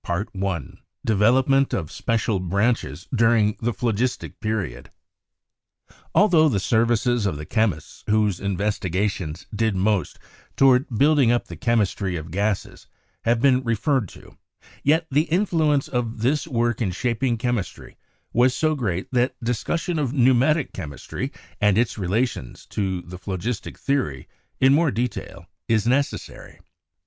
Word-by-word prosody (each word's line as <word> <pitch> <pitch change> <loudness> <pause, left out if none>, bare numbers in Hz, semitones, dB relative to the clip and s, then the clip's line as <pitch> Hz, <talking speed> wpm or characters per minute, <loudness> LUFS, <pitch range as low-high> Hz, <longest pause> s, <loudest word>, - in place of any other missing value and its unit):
CHAPTER 85 +5 -2
VIII 95 -6 -4 0.3
DEVELOPMENT 130 +6 +3
OF 80 -6 -4
SPECIAL 115 -3 0
BRANCHES 95 - -1
DURING 115 -3 +3
THE 120 +1 0
PHLOGIS 120 +2 0
TIC - - -11
PERIOD 100 - -3 1.3
Altho 170 -7 +5
the 105 -7 0
services 115 +1 +2
of 90 - -2
the 75 - -7
chemists 105 -6 -1
whose 105 -4 +2
investiga 100 -1 -1
tions 80 -4 -7
did 110 -2 +1
most 100 0 0 0.4
toward 135 0 +4
building 140 +1 +4
up 120 - +1
the - - -7
chemistry 105 -5 0
of 80 0 -6
gases 100 +3 -2 0.4
have 115 0 +3
been 130 0 +3
referred 115 +1 +1
to, - - -16 0.4
yet 160 +4 +2
the 150 +4 +3
influence 160 -6 +2
of 115 -3 -3
this 145 +7 +1
work 120 -4 0
in 105 - +1
shaping 120 +5 -1
chemistry 120 -3 -3 0.4
was 125 +2 +3
so 155 0 +1
great 100 - -2
that 125 0 +1
discussion 160 +8 -1
of 140 -4 0
pneu 130 -2 +4
matic 140 +4 +2
chemistry 75 -7 -6 0.3
and 105 -1 +4
its 115 -1 +1
relations 100 - -2
to 95 -3 -3
the 90 +1 -10
phlogistic 100 +4 -4
theory, 130 - -1 0.3
in 135 +1 +5
more 160 +2 +3
detail, 120 -3 -4 0.2
is 110 -2 +2
necessary. 140 +4 -2
115 Hz, 140 wpm, -23 LUFS, 100-130 Hz, 1.3 s, Altho